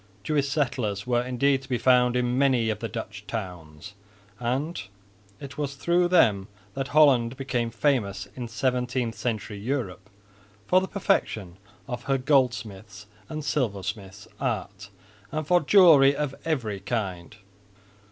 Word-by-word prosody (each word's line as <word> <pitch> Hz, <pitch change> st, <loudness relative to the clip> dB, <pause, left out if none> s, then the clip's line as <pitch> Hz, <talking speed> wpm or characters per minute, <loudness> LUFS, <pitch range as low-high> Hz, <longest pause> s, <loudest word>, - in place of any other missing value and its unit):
Jewish 140 Hz, +2 st, 0 dB
settlers 120 Hz, -8 st, -1 dB
were 120 Hz, -1 st, +1 dB
indeed 130 Hz, +2 st, +1 dB
to 135 Hz, -, -15 dB
be 125 Hz, -, +1 dB
found 125 Hz, 0 st, +4 dB
in 125 Hz, 0 st, 0 dB
many 130 Hz, -4 st, +2 dB
of 110 Hz, -, -4 dB
the 115 Hz, -, -3 dB
Dutch 105 Hz, -3 st, -7 dB
towns; 90 Hz, -4 st, -7 dB, 0.5 s
and 130 Hz, +8 st, -2 dB, 0.6 s
it 140 Hz, +2 st, -9 dB
was 140 Hz, -2 st, -3 dB
through 175 Hz, +5 st, +2 dB
them 110 Hz, -, +3 dB, 0.3 s
that 135 Hz, +2 st, -3 dB
Holland 135 Hz, -4 st, +4 dB
became 125 Hz, -3 st, -2 dB
famous 115 Hz, -7 st, 0 dB
in 125 Hz, -2 st, -5 dB
17th 125 Hz, 0 st, -1 dB
century 110 Hz, -2 st, -4 dB
Europe 105 Hz, -5 st, -4 dB, 0.6 s
for 185 Hz, -, +4 dB
the 190 Hz, -, -3 dB
perfection 100 Hz, -, -1 dB, 0.3 s
of 120 Hz, -2 st, -6 dB
her 135 Hz, -1 st, +1 dB
goldsmiths' 110 Hz, -7 st, -1 dB, 0.2 s
and 155 Hz, -1 st, -5 dB
silversmiths' 100 Hz, -7 st, -3 dB
art 100 Hz, 0 st, -3 dB, 0.4 s
and 155 Hz, 0 st, -3 dB
for 175 Hz, +3 st, +4 dB
jewelry 150 Hz, -6 st, +6 dB
of 145 Hz, -2 st, -2 dB
every 120 Hz, -11 st, -2 dB
kind. 95 Hz, -3 st, -4 dB
125 Hz, 135 wpm, -26 LUFS, 105-140 Hz, 0.6 s, jewelry